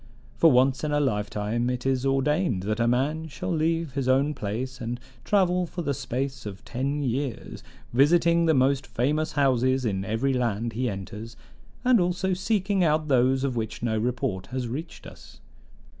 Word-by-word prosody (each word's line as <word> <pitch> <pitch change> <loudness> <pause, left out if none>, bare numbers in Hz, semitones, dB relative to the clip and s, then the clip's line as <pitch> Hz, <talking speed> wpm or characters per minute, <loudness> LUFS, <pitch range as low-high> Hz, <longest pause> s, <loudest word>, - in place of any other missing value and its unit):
For 165 - +5
once 130 +2 +3
in 150 - -1
a 145 - +2
lifetime 110 -2 -1
is 125 +1 -1
it - - +3
ordained 135 - +1
that 105 +3 -2
a 115 - +2
man 145 +7 0
shall 180 +5 -5
leave 165 -2 0
his 135 -2 -2
own 135 +3 +3
place 125 +4 -4
and 120 +1 -4 0.2
travel 180 +1 +2
for 175 +1 -5
the 145 - 0
space 130 -1 -4
of 100 -1 -9
ten 140 +4 -2
years, 130 0 -3 0.3
visiting 170 +5 +4
the 160 - +4
most 135 +2 +2
famous 150 +6 0
houses 130 -2 +2
in 95 -3 -1
every 115 +7 0
land 115 -2 -1
he 125 +2 -1
enters, 105 +3 -7 0.5
and 250 -3 +5
also 180 +1 0
seeking 195 0 0
out 155 -1 +1
those 130 0 +3
of 135 -3 -1
which 110 0 -4
no 115 -2 0
report 115 -4 -2
has 125 0 -3
reached 150 +8 -6
us. - - -13
130 Hz, 175 wpm, -26 LUFS, 120-155 Hz, 0.5 s, For